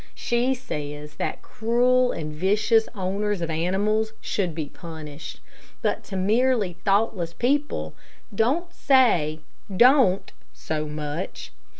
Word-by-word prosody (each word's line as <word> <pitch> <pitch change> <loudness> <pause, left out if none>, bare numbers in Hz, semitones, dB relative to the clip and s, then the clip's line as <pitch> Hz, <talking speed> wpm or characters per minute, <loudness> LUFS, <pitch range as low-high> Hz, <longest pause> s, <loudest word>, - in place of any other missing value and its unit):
She 245 +2 +1
says 150 - -6
that - - -3
cruel 245 +3 +2
and 155 -2 -5
vicious 210 +7 +2
owners 200 +1 -1
of 165 -1 -2
animals 205 +7 0
should 180 -6 -2
be 160 -2 -2
punished; 155 -2 -9 0.4
but - - 0
to 195 - -7
merely 215 +1 +2
thoughtless 195 -4 +1
people, 285 +7 0 0.4
don't 290 - 0
say 180 - +3 0.4
"Don't" 245 -6 +5 0.2
so 155 -1 -3
much. 150 - -5
200 Hz, 110 wpm, -24 LUFS, 160-240 Hz, 0.4 s, Don't